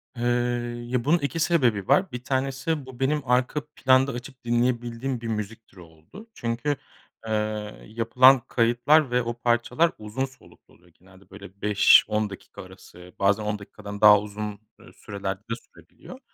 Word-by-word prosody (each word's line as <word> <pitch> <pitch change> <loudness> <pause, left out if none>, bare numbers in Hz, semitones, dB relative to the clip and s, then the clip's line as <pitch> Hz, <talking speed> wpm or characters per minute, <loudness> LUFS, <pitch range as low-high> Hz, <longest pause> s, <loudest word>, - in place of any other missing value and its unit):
Eee, 120 - -5 0.6
ya 125 -1 -1
bunun 165 +4 +4
2 140 +3 -3
sebebi 125 - +1
var. 185 -3 +3
1 125 0 -7
tanesi 135 +3 -2
bu 130 -1 -12
benim 145 +3 +1
arka 125 +4 0
planda 130 +1 +3
açıp 125 +1 -9
dinleyebildiğim 120 +1 -1
bir 115 - -5
müzik 110 0 -5
türü 90 - -16
oldu. 85 - -15
Çünkü, 120 - -2 0.5
eee, - - -4 0.6
yapılan 125 +4 +5
kayıtlar 125 +4 +2
ve 125 - +2
o 120 0 -3
parçalar 120 +7 +1
uzun 110 +5 -3
soluklu 135 0 -19
oluyor 90 0 -24
genelde 95 +1 -20
böyle 100 0 -13
5-10 105 +1 +4
dakika 95 - -11
arası 90 +1 -15
bazen 100 +2 +2
10 105 0 -2
dakikadan 100 0 -10
daha 105 -1 +8
uzun, 105 0 -6 0.2
eee, - - -17
sürelerde 100 -1 -5
de 115 +2 -6
sürebiliyor. 255 - -15
120 Hz, 155 wpm, -25 LUFS, 105-130 Hz, 0.6 s, daha